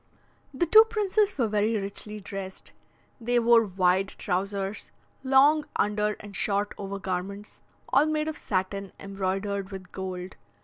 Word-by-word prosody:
The 290 +6 0
two 435 +7 +8
princes 425 -3 +1
were 240 -4 +2
very 215 +1 +1
richly 210 +1 -5
dressed; 195 -1 -7 0.5
they 240 +1 0
wore 235 -1 +5
wide 185 0 +2
trousers, 195 +2 -3 0.3
long 280 +3 +5
under 210 +1 +1
and 205 -1 -10
short 205 +1 0
over 200 0 -4
garments, 195 +2 -5 0.3
all 280 +4 +4
made 310 0 0
of 315 - -3
satin, 195 -3 -3
embroidered 195 0 -3
with 190 -3 -9
gold. 185 -1 -6
200 Hz, 135 wpm, -27 LUFS, 195-240 Hz, 0.5 s, two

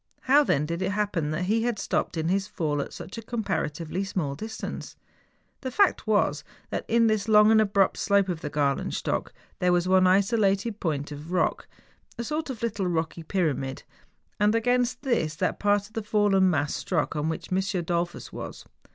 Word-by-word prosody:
How 285 +3 +5
then 150 - +1
did 170 +3 -3
it 190 +1 0
happen 200 -7 -1
that 155 +4 -2
he 215 +5 +1
had 235 -1 0
stopped 180 - -1
in 160 0 -1
his 195 +2 +1
fall 150 -7 -1
at - - -6
such 205 - -8
a - - -6
comparatively 190 -6 -2
small 180 -8 -2
distance? 220 +10 -6 0.7
The 260 - -3
fact 370 - +2
was 185 -8 +2 0.3
that - - -3
in 230 0 +3
this 215 -2 +1
long 210 0 +6
and 220 -1 +6
abrupt 200 -2 +2
slope 200 -1 +2
of 175 -3 -3
the 150 - -4
Grailenstock 145 -2 -1 0.3
there 180 0 +3
was 175 0 +2
one 185 0 +5
isolated 200 +2 +2
point 150 -4 -2
of 150 +3 -8
rock, 180 - 0 0.5
a 235 - -3
sort 305 +4 -3
of 235 -4 -6
little 205 -5 -1
rocky 165 -1 -2
pyramid, 155 -7 -2 0.6
and 210 +2 +3
against 245 +2 +1
this 225 - 0
that 180 - -1
part 205 0 +2
of 215 - -17
the 225 - -2
fallen 205 -3 +3
mass 145 -4 0
struck 165 -3 -1
on 150 +1 -1
which 160 - -5
M. 185 - +2 0.2
Dollfus 170 +1 -3
was. - - -7
195 Hz, 185 wpm, -26 LUFS, 160-220 Hz, 0.7 s, long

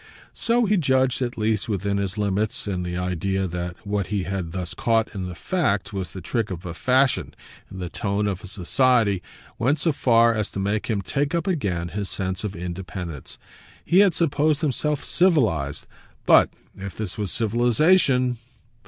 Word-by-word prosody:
So 235 +1 +1
he 210 0 +2
judged 130 -5 +2
at 120 -1 -2
least, 110 0 0
within 100 0 -1
his 100 +1 -2
limits, 105 +1 -1
and 95 -3 -2
the 90 0 -3
idea 90 +2 -1
that 90 0 -4
what 100 -2 -1
he 100 -3 -1
had 95 -3 -3
thus 90 -1 -4
caught 115 -1 +1
in 95 -3 -4
the 90 - -7
fact 115 - -1
was 95 -4 -3
the 95 - -8
trick 115 +5 -1
of 90 -2 -6
fashion 130 +5 +2 0.3
and 95 - -9
the 90 - -3
tone 100 +3 -1
of 100 -3 -1
society 105 0 +2 0.4
went 135 +7 +2
so 165 +2 +1
far 115 -4 +4
as 110 -1 -1
to - - -3
make 100 +2 -1
him 105 -4 -1
take 145 - -1
up 170 - -1
again 95 - -1
his 100 +3 -4
sense 95 0 -3
of 105 -2 -4
independence. 90 -3 -6 0.5
He 180 - +4
had 195 -5 +5
supposed 150 -2 +1
himself 150 0 -1
civilised; 110 - +2 0.4
but - - +6 0.3
if 95 -1 -8
this 110 -2 -4
was 100 -3 -1
civilisation 125 - +3
105 Hz, 170 wpm, -24 LUFS, 95-130 Hz, 0.5 s, but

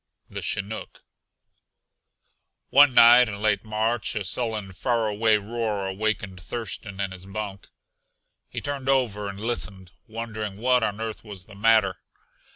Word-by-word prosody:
THE - - -5
CHINOOK 100 +2 -4 1.7
One 140 -2 +7
night 120 +1 +8
in 100 -1 -6
late 105 -1 +1
March 110 +2 0
a 105 - -1
sullen, 105 -1 -2
faraway 110 +1 +1
roar 105 -1 -3
awakened 95 -1 -2
Thurston 100 -1 -5
in 100 -1 -2
his 95 0 -9
bunk. 100 -1 -6 0.8
He - - -5
turned 140 -2 -3
over 110 -7 +1
and 100 0 -8
listened, 100 -5 -3 0.2
wondering 110 -3 -5
what 125 +1 +3
on 105 -1 -1
earth 110 -1 -5
was 100 -4 -9
the 105 - -15
matter. 105 -2 +3
110 Hz, 135 wpm, -25 LUFS, 100-115 Hz, 1.7 s, night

